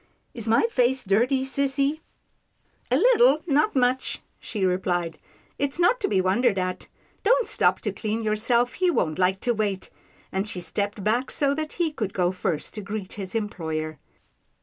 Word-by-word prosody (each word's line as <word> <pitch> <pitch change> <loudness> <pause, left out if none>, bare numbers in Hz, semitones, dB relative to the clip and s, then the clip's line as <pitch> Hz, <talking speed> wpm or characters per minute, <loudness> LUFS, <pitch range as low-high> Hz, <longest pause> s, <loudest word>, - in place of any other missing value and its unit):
Is 230 -2 -5
my 225 +1 +4
face 260 - +2
dirty, 240 +7 +2
sissy? 275 +2 +1 0.3
" - - -46
" - - -39
A - - +5
little, 480 -9 +5
not 300 -3 +2
much," 255 0 +1 0.2
she 205 -4 -2
replied, 175 -3 -1 0.2
" - - -35
it's 280 +1 -1
not 355 +8 +3
to 410 - 0
be 195 - +1
wondered 195 +4 +2
at. 185 0 -3 0.4
Don't - - +3
stop - - +2
to - - -2
clean 220 +1 -3
yourself, 235 +3 +1
he 370 -1 +1
won't 160 - 0
like 190 +1 +2
to 240 - +1
wait," 205 -4 -2 0.4
and 190 +2 -1
she 190 - -3
stepped 200 +4 -3
back, 235 +5 +1
so 280 -1 +1
that 310 +1 -4
he 340 -3 0
could 215 -9 -4
go 180 -1 +2
first 175 -4 -3
to 210 - -6
greet 200 -1 -5
his 195 0 -7
employer. 160 -8 -3
220 Hz, 180 wpm, -25 LUFS, 190-275 Hz, 0.4 s, A